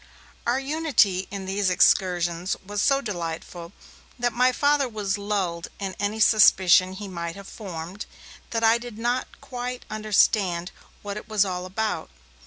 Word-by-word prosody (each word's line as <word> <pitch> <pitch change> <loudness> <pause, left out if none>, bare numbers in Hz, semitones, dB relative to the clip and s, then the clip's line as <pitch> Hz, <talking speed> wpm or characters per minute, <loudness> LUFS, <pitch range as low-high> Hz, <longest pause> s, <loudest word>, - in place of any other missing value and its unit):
Our 245 +2 +2
unity 270 - +1
in 195 -1 -6
these 195 0 0
excursions 180 -1 +2
was 205 +1 -2
so 275 +2 +3
delightful, 170 -4 -5 0.5
that 240 -1 0
my 250 +2 +3
Father 285 0 +2
was 210 -3 -2
lulled 190 -5 -2
in 195 -2 -4
any 205 +2 -2
suspicion 190 -4 +5
he 205 +1 -7
might 170 -2 -5
have 200 -1 -10
formed 185 -1 -7 0.4
that 230 -1 -2
I 225 +1 +5
did 240 -2 -9
not 240 +3 -1
quite 250 0 -6
understand 200 -4 +1 0.3
what 205 0 -5
it 210 - -9
was 210 -2 +3
all 180 -1 -4
about. 190 -4 -2
205 Hz, 150 wpm, -25 LUFS, 185-230 Hz, 0.5 s, suspicion